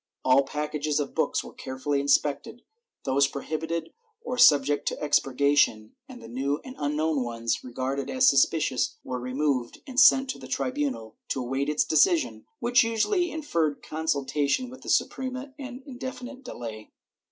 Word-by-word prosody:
All 130 +1 +6
packages 150 +1 -2
of 140 -2 -3
books - - 0
were - - -11
carefully 140 +2 -3
inspected, 145 - 0 0.4
those 135 +1 +3
prohibited 160 +4 -4 0.3
or 250 - -3
subject 145 - +5
to - - -1
expurgation, 140 -6 +2 0.2
and 250 -2 -11
the - - -9
new 135 +5 -2
and 260 -1 -9
unknown 150 0 0
ones 115 -1 -2
regarded 130 +2 -3
as 260 0 +3
sus 140 -1 +6
picious 150 -6 -1
were 125 -1 -4
removed 130 0 -2
and 260 -2 -1
sent 270 0 +7
to - - -9
the - - -10
tribunal 260 - -3
to - - -2
await 135 +3 -2
its 150 0 +1
decision, 315 - +2
which 245 +1 +4
usually 230 - +1
inferred 170 - -1
consultation 150 - -1
with 260 - -12
the - - -8
Suprema 260 +1 -1
and 265 -1 -7
indefi 260 -2 -7
nite 265 +1 -9
delay. 115 - -8
150 Hz, 155 wpm, -26 LUFS, -, 0.4 s, sent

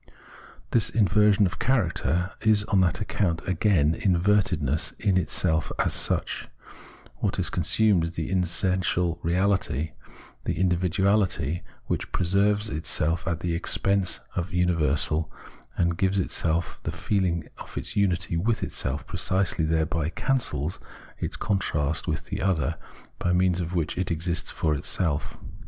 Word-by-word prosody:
This 115 - +3
inversion 105 0 +4
of 90 - -3
character, 110 -11 +1
however, 90 +2 -2
is 110 -1 +4
on 100 -2 +2
that 90 +3 +1
account 90 -5 -1
again 90 -5 +2
invertedness 90 -6 +1
in 100 -3 +1
itself 85 -2 +1
as - - +1
such. - - 0 0.7
Wliat - - 0
is - - -1
consumed 90 +1 +2
is 85 - -4
the 80 +2 -4
essential 90 -1 0
reahty: 90 -4 0 0.5
the - - -1
IndividuaUty, 90 -2 +1 0.2
which - - -3
pre 90 - -1
serves 100 +3 +2
itself 80 -1 0
at 85 -1 -2
the 85 -1 -1
expense 100 +2 0
of 90 +1 -2
the 90 - -4
universal 80 -2 +1 0.5
and 85 -1 +1
gives 95 +1 +2
itself 85 -2 0
the - - -3
feeling 90 -5 -1
of - - -10
its - - -5
unity 90 -4 +1
with 110 +7 0
itseH, 65 +3 -2
precisely 95 -4 +1
thereby 80 0 0
cancels 90 - 0 0.4
its - - -2
contrast 80 -6 -1
with 80 0 -2
the 100 +1 -4
other, 85 -6 0 0.4
by 90 - 0
means 90 0 +2
of 85 +1 -4
which 85 0 -1
it 95 - -1
exists 85 +1 -2
for 80 -2 0
itself. 75 +1 -1
90 Hz, 140 wpm, -26 LUFS, 80-100 Hz, 0.7 s, inversion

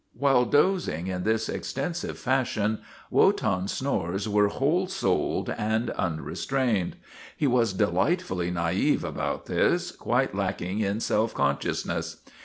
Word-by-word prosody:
While 135 -3 +4
dozing 145 - +2
in 90 -1 -3
this 110 0 +1
extensive 175 -1 -3
fashion, 120 -5 0 0.3
Wotan's 95 +1 +2
snores 100 -7 -1
were 105 0 +3
whole 155 - +1
souled 180 - 0
and 110 +2 0
unrestrained. 100 +4 -1 0.4
He - - 0
was 120 -5 +3
delightfully 95 - +1
na'ive 85 -2 +1
about - - -3
this, - - +1
quite - - 0
lacking 95 +4 -2
in 105 +1 0
self 110 0 +1
consciousness. 70 0 -1
110 Hz, 115 wpm, -27 LUFS, 95-135 Hz, 0.4 s, While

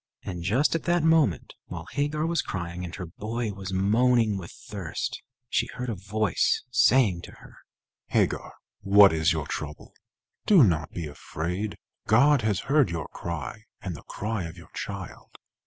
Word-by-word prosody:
And 90 -3 -5
just 115 - +2
at 165 - -2
that 175 -1 +2
moment, 160 - +3
while - - -7
Hagar 145 +2 0
was 170 0 +1
crying, 85 -1 -5
and 85 0 -6
her 90 - -5
boy 110 +5 -4
was 95 -1 -6
moaning 110 +3 +3
with 90 -3 -6
thirst, 100 -6 -5 0.3
she - - +1
heard 125 0 -4
a - - -1
voice 100 0 0
saying 125 -7 +4
to - - -11
her: - - -16 0.5
"Hagar, - - 0 0.2
what 100 -2 +7
is 80 -1 +3
your 80 -2 -1
trouble? 75 +1 -6 0.5
Do 190 -9 +8
not 80 -8 +2
be 85 - -5
afraid. 85 +7 -4 0.3
God 140 +5 +5
has 105 -3 0
heard 140 - +3
your 85 -3 -4
cry 75 -8 -6
and - - -5
the - - -10
cry 105 -3 -4
of 85 +2 -8
your 85 - -14
child. - - -7
100 Hz, 165 wpm, -27 LUFS, 85-125 Hz, 0.5 s, Do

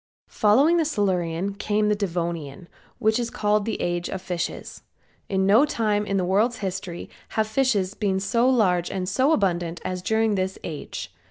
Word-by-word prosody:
MUMFORD - - -89
PUBLISHER.] - - -20
Following 270 +11 +5
the 325 - +2
Silurian 190 - -1
came 210 +1 0
the 210 - +3
Devonian, 170 -4 -3 0.3
which 220 +2 +2
is 235 -1 -2
called 210 -1 +1
the 225 - -3
age 175 0 -2
of 190 - -4
fishes. 180 -2 -5 0.5
In 190 -1 +1
no 210 +7 +6
time 215 -7 0
in 195 - 0
the 185 - +1
world's 215 +6 +2
history 190 -3 -5 0.3
have 220 - +3
fishes 220 -5 +1
been 200 -3 0
so 230 +6 +2
large 185 -9 +2
and 185 -1 -3
so 260 +9 +2
abundant 175 - 0
as 180 -1 -3
during 220 +2 +1
this 190 -1 -1
age. 155 -3 -6
200 Hz, 180 wpm, -24 LUFS, 180-220 Hz, 0.5 s, no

